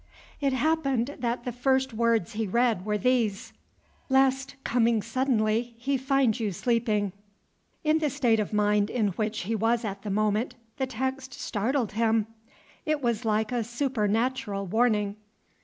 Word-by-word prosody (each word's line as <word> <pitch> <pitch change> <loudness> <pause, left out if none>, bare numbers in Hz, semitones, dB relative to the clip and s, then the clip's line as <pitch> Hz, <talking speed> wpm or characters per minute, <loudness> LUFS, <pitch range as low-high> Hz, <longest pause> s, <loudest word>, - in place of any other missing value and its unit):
It 275 -2 +1
happened 275 -2 0
that 240 0 -2
the 250 - -3
first 265 +1 +1
words 230 -3 +1
he 220 0 -2
read 225 -2 +1
were 210 0 +1
these, 225 -3 0 0.6
"Lest, 270 0 +2
coming 230 -3 +2
suddenly, 235 -2 0
he 270 +4 -1
find 265 -3 +2
you 215 -3 -1
sleeping." 215 -2 0 0.7
In 310 +1 +3
the 305 -2 +1
state 235 -4 +2
of 210 - -2
mind 210 0 +2
in 220 -5 +1
which 215 +3 -2
he 210 +5 -2
was 225 +2 +1
at 200 -1 -4
the 210 - -5
moment, 215 +4 0 0.2
the 265 - -1
text 260 +1 -3
startled 230 +2 -1
him. 225 0 +2 0.6
It 305 -2 -1
was 235 -1 0
like 215 +1 +1
a 240 -2 0
supernatural 230 -3 -1
warning. 210 0 +1
235 Hz, 150 wpm, -27 LUFS, 215-260 Hz, 0.7 s, In